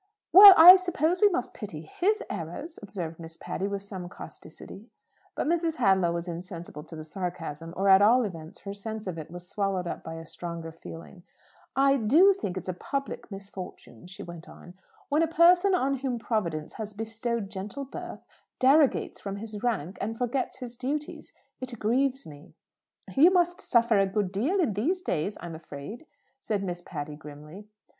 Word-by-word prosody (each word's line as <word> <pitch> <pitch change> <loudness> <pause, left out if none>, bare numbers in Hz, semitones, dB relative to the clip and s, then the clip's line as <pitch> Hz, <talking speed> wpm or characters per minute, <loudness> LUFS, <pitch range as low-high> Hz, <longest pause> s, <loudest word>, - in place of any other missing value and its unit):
"Well, 390 +1 +12
I 360 +4 +11
suppose 355 -1 0
we 415 - +7
must 360 - -2
pity - - -7
his 405 +3 0
errors," 175 - -6
observed 175 -6 -6
Miss 165 0 -10
Patty, 195 - -4
with 200 -1 -4
some 190 -3 -7
causticity. - - -12 0.5
But - - -2
Mrs. 330 0 0
Hadlow 190 - +3
was 170 +1 -4
insensible 170 -3 -7
to 165 - -11
the 155 - -7
sarcasm; 165 -2 -6
or, 195 +1 0
at 190 0 +7
all 240 +5 +5
events, 165 -5 -8
her 200 - -6
sense 220 +1 -7
of 180 -4 -5
it 155 - -8
was 175 +1 -10
swallowed 195 -3 -2
up - - -5
by 160 - -7
a 165 0 -8
stronger 170 0 -7
feeling. 165 +3 -11 0.5
"I 275 0 +4
do 305 - +5
think 195 - -5
it's 185 - -6
a 185 - -2
public 275 +9 -5
misfortune," 190 - -10
she 185 - -9
went 170 -1 -10
on, 175 - -13 0.4
"when 295 +2 +2
a 330 - +3
person 355 +4 +5
on 275 -4 0
whom 260 -2 -2
Providence 175 -10 -3
has 215 -1 -6
bestowed 225 0 -3
gentle 210 +8 -6
birth 270 - -8 0.4
derogates 275 +2 +3
from 195 -1 -5
his 210 0 -7
rank 195 -8 -2
and 225 +2 -3
forgets 250 +2 -2
his 245 -2 -8
duties. 290 +4 -4 0.3
It 255 -2 -6
grieves 265 +5 0
me." 145 0 -14 0.6
"You 305 +6 +7
must 355 -1 +1
suffer 235 -3 +3
a 195 - +3
good 195 -1 -1
deal 265 - 0
in 300 - +1
these 335 - -1
days, 180 +5 -2
I'm 175 -1 -7
afraid," 160 - -9 0.3
said 210 -6 -2
Miss 175 -2 -4
Patty, 150 -4 -7
grimly. 150 +6 -12
205 Hz, 180 wpm, -27 LUFS, 175-275 Hz, 0.6 s, Well